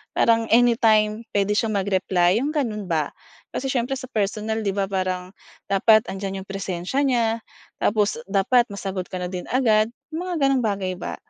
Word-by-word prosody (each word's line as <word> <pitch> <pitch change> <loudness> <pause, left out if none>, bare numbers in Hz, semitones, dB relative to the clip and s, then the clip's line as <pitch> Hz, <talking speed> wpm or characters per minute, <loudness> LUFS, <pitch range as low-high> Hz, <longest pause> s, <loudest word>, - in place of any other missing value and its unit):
parang 230 -1 +3
anytime 225 -2 +3
puwede 200 0 +2
siyang 215 0 +1
mag-reply 190 0 +2
yung 295 +4 -2
gano'n 215 -9 -2
ba. 155 -4 0 0.4
Kasi 270 - -3
siyempre 250 +1 -1
sa 255 - -8
personal 215 +1 -1
'di - - +2
ba 200 - +1
parang 185 -1 -2 0.4
dapat 215 +3 +5
andiyan 195 0 -4
yung - - -25
presensiya 195 +6 -2
niya 240 -3 +2 0.5
tapos 210 +2 +1
dapat 215 +5 +3
masagot 195 -2 -4
ka - - -8
na 180 - -3
din 180 -1 -4
agad, 220 -4 +3 0.2
yung 350 +4 -4
mga 355 - -2
ganong 270 -1 +2
bagay 195 -3 -1
ba. - - -4
210 Hz, 170 wpm, -23 LUFS, 195-235 Hz, 0.5 s, dapat